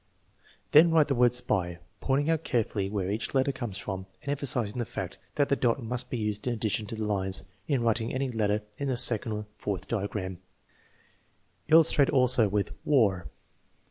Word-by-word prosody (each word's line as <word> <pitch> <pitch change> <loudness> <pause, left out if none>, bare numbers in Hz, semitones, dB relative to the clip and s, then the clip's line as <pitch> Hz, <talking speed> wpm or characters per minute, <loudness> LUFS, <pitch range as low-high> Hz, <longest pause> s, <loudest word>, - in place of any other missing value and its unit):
' - - -39
" - - -34
Then 160 +3 +7
write 160 -3 +3
the - - +2
word 125 -1 +3
spy, 95 -8 0 0.2
pointing 140 +2 0
out 165 -1 -1
carefully 105 -6 -2
where 100 -2 -3
each 110 +6 -4
letter 135 +1 +2
comes 120 -7 -6
from, 95 -3 -6 0.2
and 140 - -3
emphasizing 125 -6 -2
the - - 0
fact - - -7 0.2
that 145 -1 +1
the 140 - +2
dot 125 0 0
must 120 +2 -4
be 125 - -3
used 105 0 -4
in 125 - 0
addition 110 -1 -2
to 115 - -6
the 110 -1 -4
lines 95 -2 0 0.2
in 135 -5 0
writing 115 0 0
any 130 0 -2
letter 105 -2 -1 0.2
in 140 - -3
the 130 -2 -1
second 115 -2 +7
or 105 - -4
the - - -20
fourth 100 -2 -4
diagram. 100 -4 -4 1.3
Illustrate 155 -3 +4
also 125 -5 +4
with 100 0 -2
war. 105 - +1
115 Hz, 195 wpm, -27 LUFS, 105-135 Hz, 1.3 s, Then